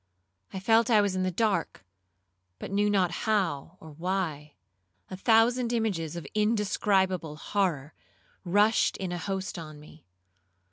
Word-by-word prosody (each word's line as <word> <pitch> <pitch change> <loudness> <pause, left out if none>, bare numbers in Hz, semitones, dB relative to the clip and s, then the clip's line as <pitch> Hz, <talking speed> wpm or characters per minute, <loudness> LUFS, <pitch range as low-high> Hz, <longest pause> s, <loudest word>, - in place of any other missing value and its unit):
I 190 - -5
felt 225 +4 +3
I 220 -3 +5
was 200 -2 +1
in 185 - -1
the 185 - +1
dark, 195 - -1 0.7
but - - -8
knew 205 +1 +2
not 190 -4 +2
how 180 -5 -1
or 160 - -12
why. 160 -3 -3 0.6
A - - -4
thousand 230 +4 +3
images 190 -9 -1
of 170 -4 -6
indescribable 200 -6 +1
horror 155 -4 -2 0.5
rushed 205 +5 +2
in 185 -2 -4
a 175 - -3
host 190 0 -4
on 155 -2 -9
me. 150 -2 -17
190 Hz, 140 wpm, -28 LUFS, 165-210 Hz, 0.7 s, I